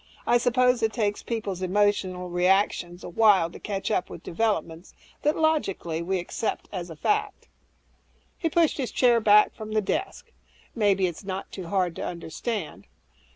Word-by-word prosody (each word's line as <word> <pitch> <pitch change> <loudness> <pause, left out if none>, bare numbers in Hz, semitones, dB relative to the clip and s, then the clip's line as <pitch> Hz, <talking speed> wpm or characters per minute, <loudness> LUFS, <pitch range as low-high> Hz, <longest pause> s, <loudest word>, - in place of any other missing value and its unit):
I 240 - +4
suppose 250 0 +2
it 220 - +2
takes 210 -3 -1
people's 205 -6 -4
emotional 185 -2 0
reactions 180 -1 +1
a - - -6
while 190 -3 +4
to - - -11
catch 200 0 -3
up 180 - 0
with 170 - -10
developments 170 -4 -2 0.3
that, 300 +1 +1
logically, 195 - 0
we 190 +3 -1
accept 185 +5 -3
as 180 -3 -5
matter - - -7
of 155 - -18
fact." 420 0 -1 0.9
He 330 - -1
pushed 330 0 +2
his 255 - -1
chair 240 -2 +4
back 210 -1 +5
from 215 -1 -8
the 215 - +3
desk, 460 - -3 0.4
"Maybe 200 -4 +2
it's 175 +2 -4
not 190 0 -5
too 185 -3 -7
hard 180 -2 0
to - - -4
understand. 170 - -5
205 Hz, 165 wpm, -26 LUFS, 180-230 Hz, 0.9 s, back